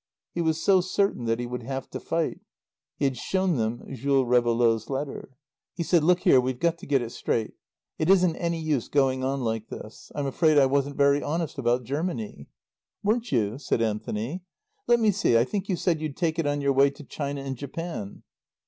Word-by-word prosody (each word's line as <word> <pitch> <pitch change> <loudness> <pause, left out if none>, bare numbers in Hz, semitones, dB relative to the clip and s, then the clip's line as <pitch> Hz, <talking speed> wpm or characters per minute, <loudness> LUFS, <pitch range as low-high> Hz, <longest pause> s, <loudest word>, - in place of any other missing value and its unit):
He 175 - -1
was 160 -1 +1
so 190 +1 +4
certain 185 -7 0
that 115 0 0
he 120 - -2
would 125 +1 -5
have 135 +2 -5
to - - -4
fight. 165 +1 -2 0.6
He 145 - 0
had 135 -1 +1
shown 185 +2 0
them 115 +1 -2
Jules 135 0 +1
Réveillaud's 120 -2 +2
letter. 135 -1 -5 0.4
He 170 - -2
said, 165 0 +3
"Look 180 +2 +4
here, 130 - +6
we've 130 0 -2
got 170 0 +1
to - - -10
get 135 -3 +2
it 115 - -6
straight. 110 -2 -2 0.5
It 155 - +1
isn't 180 -4 +5
any 170 -1 -1
use 155 -6 -1
going 130 -2 +1
on 135 +1 -1
like 110 -2 -2
this. 110 - -10
I'm 145 - -2
afraid 155 +3 +3
I 140 - +7
wasn't 140 +1 0
very 140 0 +4
honest 160 -1 -3
about 120 0 +1
Germany." 170 - -4 0.5
"Weren't 225 +3 0
you?" 115 -1 0
said 140 - 0
Anthony. 110 - -3 0.5
"Let 240 0 +5
me 220 -2 +4
see, 195 - +3
I 115 - +5
think 195 - -4
you 185 - +2
said 165 -2 0
you'd 155 -3 -4
take 165 -2 0
it 160 - +1
on 145 0 0
your 140 -1 +2
way 135 +1 +5
to 140 +2 -12
China 140 0 -4
and 135 -1 -4
Japan." 140 - -6
140 Hz, 205 wpm, -26 LUFS, 125-170 Hz, 0.6 s, I